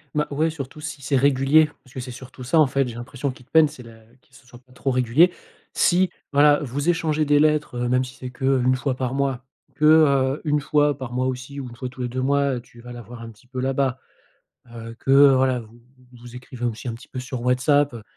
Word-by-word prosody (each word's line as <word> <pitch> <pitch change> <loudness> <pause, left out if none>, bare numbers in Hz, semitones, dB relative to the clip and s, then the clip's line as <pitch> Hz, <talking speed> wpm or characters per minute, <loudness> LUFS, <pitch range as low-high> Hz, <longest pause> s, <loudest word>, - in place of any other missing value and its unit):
Bah 150 0 0
ouais, 155 +3 0
surtout 150 -1 -8
si 150 -1 -7
c'est 140 +1 -1
régulier. 140 +3 +4
Parce 130 -1 -20
que 130 - -4
c'est 125 0 -7
surtout 130 +1 -11
ça 160 +6 +2
en 155 - +5
fait, 135 0 0
j'ai 120 - -6
l'impression 130 +3 -5
qui 125 - -15
te - - -32
peine. 160 -1 +6
C'est 145 -3 -12
la 115 -1 -14
que 120 +4 -26
ce 130 0 -20
soit 120 -1 -15
pas 130 +1 -28
trop 135 +2 -2
régulier. 130 +8 +3 0.4
Si 180 +1 +3 0.2
voilà 145 0 +5
vous 140 +3 -4
échangez 160 -3 +1
des 145 0 +3
lettres, 150 -3 +1
heu, 120 0 -1
même 125 +1 +2
si 130 0 -10
c'est 130 - -8
qu'1 130 0 +1
fois 130 +1 -2
par 130 0 -3
mois, 135 -2 -1 0.3
que, 150 - -1
heu, 140 -3 +4
1 150 -1 +1
fois 150 0 +2
par 130 -3 -7
mois 130 +1 0
aussi 130 +2 -5
ou 135 - -6
1 120 - -11
fois 130 +1 -6
tous 130 0 -10
les - - -1
2 130 +2 -3
mois, 140 +1 +1
heu, 120 - -5
tu 120 -1 -19
vas 120 +1 -11
la 120 0 -8
voir 120 +1 -11
un 115 - -8
petit 110 +3 -22
peu 130 +1 -6
là-bas, 130 0 -1 0.7
heu, 115 -1 -9
que 135 - -1 0.2
voilà 130 -2 +1
vous 115 +2 -17 0.3
vous 125 - -16
vous 120 0 -12
écrivez 125 -1 -7
aussi 120 +1 -4
un - - -4
petit 115 - -12
peu 130 - -7
sur 130 -1 -6
WhatsApp, 125 +3 +2
heu. 115 -2 -9
130 Hz, 255 wpm, -22 LUFS, 125-145 Hz, 0.7 s, peine